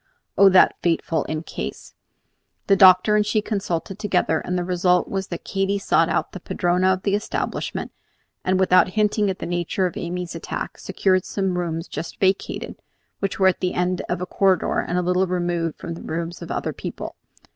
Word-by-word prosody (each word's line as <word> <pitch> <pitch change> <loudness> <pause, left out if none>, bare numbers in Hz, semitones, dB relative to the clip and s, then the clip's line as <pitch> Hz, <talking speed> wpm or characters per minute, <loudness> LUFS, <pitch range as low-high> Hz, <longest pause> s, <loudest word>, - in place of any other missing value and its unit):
Oh, 200 - +7
that 185 -1 +5
fateful 165 -2 0
"in 155 +1 -3
case"! - - -7 0.7
The 195 - +4
doctor 190 +2 +6
and 210 - +4
she 215 +1 +1
consulted 195 -3 -3
together, 180 -6 +1
and 180 - -3
the 180 - -1
result 180 0 +2
was 195 -1 -3
that 170 - -6
Katy 195 0 -1
sought 200 - +2
out - - -1
the - - -7
padrona 180 +1 +1
of 185 +1 -1
the 200 - 0
establishment, 205 +1 -3 0.5
and 185 0 +1
without 185 -1 +5
hinting 210 -1 +2
at 190 - -2
the - - -6
nature 175 +2 -1
of 180 - -3
Amy's 175 0 -4
attack, 165 - -5
secured 190 -1 +1
some 195 -2 -2
rooms 165 -1 -3
just 165 - -6
vacated, 190 0 -1 0.4
which 195 -1 -2
were 190 -1 +6
at 185 - -2
the 180 - -1
end 180 0 0
of 180 0 -2
a - - -1
corridor, 190 -1 +1
and 175 - -2
a 180 - +1
little 180 +1 +2
removed 175 -2 -1
from 170 - -6
the 165 - -9
rooms 165 +1 -4
of - - -8
other - - -2
people. - - -7
180 Hz, 190 wpm, -23 LUFS, 175-195 Hz, 0.7 s, Oh